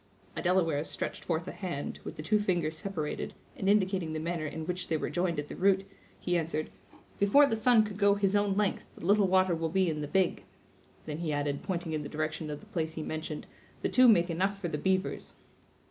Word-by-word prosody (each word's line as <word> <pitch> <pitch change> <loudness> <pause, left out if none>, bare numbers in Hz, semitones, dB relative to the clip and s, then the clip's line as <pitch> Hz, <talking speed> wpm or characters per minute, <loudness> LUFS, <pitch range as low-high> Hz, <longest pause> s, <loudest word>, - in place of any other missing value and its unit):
A - - -3
Delaware 170 -5 +2
stretched - - -4
forth 165 0 -1
a - - -3
hand, 175 -7 -5
with - - -7
the 155 - -7
two 210 +6 +2
fingers 175 -6 0
separated, 165 -6 -4 0.2
and 195 - -1
indicating 190 -5 +2
the 155 - -2
manner 165 -1 -2
in 155 +2 -5
which 180 +2 -3
they 160 - +1
were - - -3
joined 175 +1 0
at 145 0 -3
the - - -7
root, 195 0 +3 0.3
he 180 - -1
answered: 155 -1 -3 0.5
"Before 205 +9 +6
the 250 - 0
sun 225 0 +5
could 210 -1 -6
go 200 -1 +5
his 200 0 +1
own 205 -1 +2
length, 210 -2 -1
the - - -9
little 205 +1 +4
water 185 -1 +3
will 165 -1 -1
be 185 0 +2
in 150 -1 -3
the 145 - -3
big." 185 +2 +1 0.6
Then 150 +1 -5
he 165 -3 -2
added, 145 -1 -1
pointing 175 -3 -3
in 155 - -1
the 145 - -6
direction 155 0 -3
of 150 -1 -5
the - - -15
place 160 -6 -3
he 160 - -4
mentioned, 155 -1 -5 0.4
"the - - +1
two 255 0 +6
make 175 -6 +5
enough 195 +4 0
for 175 -4 -3
the 150 - -3
beavers." 190 +3 -1
175 Hz, 225 wpm, -30 LUFS, 155-195 Hz, 0.6 s, Before